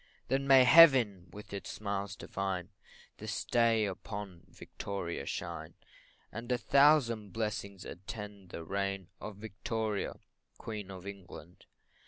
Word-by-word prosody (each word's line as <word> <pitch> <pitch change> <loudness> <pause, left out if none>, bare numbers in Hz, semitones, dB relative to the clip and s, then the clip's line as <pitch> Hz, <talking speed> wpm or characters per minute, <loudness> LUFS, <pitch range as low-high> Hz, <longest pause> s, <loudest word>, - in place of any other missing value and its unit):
Then 135 +2 +1
may 135 -1 +8
Heaven, 125 - +7
with 105 +2 -11
its 100 - -5
smiles 100 -2 -3
divine, 95 -3 -3 0.5
This - - -3
day 115 -2 +3
upon 100 -2 -6
Victoria 100 -4 -5
shine, - - -5 0.6
And 115 +3 -6
a 125 - +3
thousand 120 -7 +4
blessings 100 -4 -3
attend 100 0 -8
the 85 - -7
reign 100 +1 -2
Of 105 - -7
Victoria, 110 +1 -3 0.4
Queen 105 -3 -6
of 95 -1 -9
England. 95 -3 -10
100 Hz, 120 wpm, -32 LUFS, 95-115 Hz, 0.6 s, may